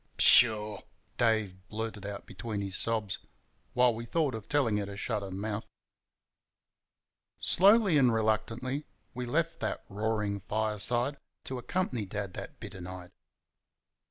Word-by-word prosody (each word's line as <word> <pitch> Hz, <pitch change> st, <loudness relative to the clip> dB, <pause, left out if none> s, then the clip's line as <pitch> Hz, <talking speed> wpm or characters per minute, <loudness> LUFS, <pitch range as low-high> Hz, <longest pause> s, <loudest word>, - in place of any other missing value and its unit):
"Pshah!" 110 Hz, -4 st, +5 dB, 0.4 s
Dave 110 Hz, -5 st, +2 dB
blurted 110 Hz, -2 st, -4 dB
out 100 Hz, 0 st, -6 dB
between 110 Hz, -3 st, -5 dB
his 100 Hz, -1 st, -3 dB
sobs, 110 Hz, -4 st, 0 dB, 0.6 s
while 125 Hz, -1 st, +5 dB
we 115 Hz, +1 st, -5 dB
thought 145 Hz, +3 st, 0 dB
of 110 Hz, -2 st, -7 dB
telling 130 Hz, -8 st, +2 dB
her 100 Hz, -1 st, -2 dB
to 100 Hz, 0 st, -7 dB
shut 105 Hz, 0 st, -1 dB
her 100 Hz, -, -5 dB
mouth. 100 Hz, +3 st, -3 dB, 1.7 s
Slowly 195 Hz, -3 st, +5 dB
and 125 Hz, -3 st, +5 dB
reluctantly 115 Hz, +5 st, 0 dB, 0.3 s
we 125 Hz, 0 st, -4 dB
left 165 Hz, +6 st, 0 dB
that -, -, -3 dB
roaring 105 Hz, 0 st, -1 dB
fireside 110 Hz, +6 st, 0 dB, 0.3 s
to 130 Hz, -1 st, -4 dB
accompany 125 Hz, -, -1 dB
Dad 100 Hz, -1 st, -4 dB
that -, -, -7 dB
bitter 95 Hz, -, -8 dB
night. 90 Hz, 0 st, -8 dB
110 Hz, 130 wpm, -31 LUFS, 100-125 Hz, 1.7 s, Pshah